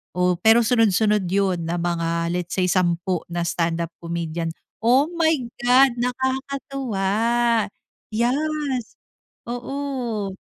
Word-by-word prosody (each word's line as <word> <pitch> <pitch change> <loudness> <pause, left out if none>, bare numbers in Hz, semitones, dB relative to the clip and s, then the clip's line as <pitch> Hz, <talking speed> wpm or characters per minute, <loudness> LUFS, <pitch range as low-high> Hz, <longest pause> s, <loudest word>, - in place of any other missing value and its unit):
oh, 180 -1 +2
pero 225 +1 +5
sunod-sunod 210 -4 +3
yun 185 -3 0
na 170 - -1
mga 170 -1 -1
let's 175 -1 -3
say 185 - +1
10 175 -1 +1
na 175 0 -2
standup 170 -1 -1
comedian. 170 -1 -3 0.3
Oh 260 +7 +4
my 325 -1 +3 0.3
God, 250 +2 +5
nakakatuwa, 260 -4 -2 1.0
yes 270 +1 -1 0.5
oo. 245 -5 -3
210 Hz, 105 wpm, -23 LUFS, 175-260 Hz, 1.0 s, pero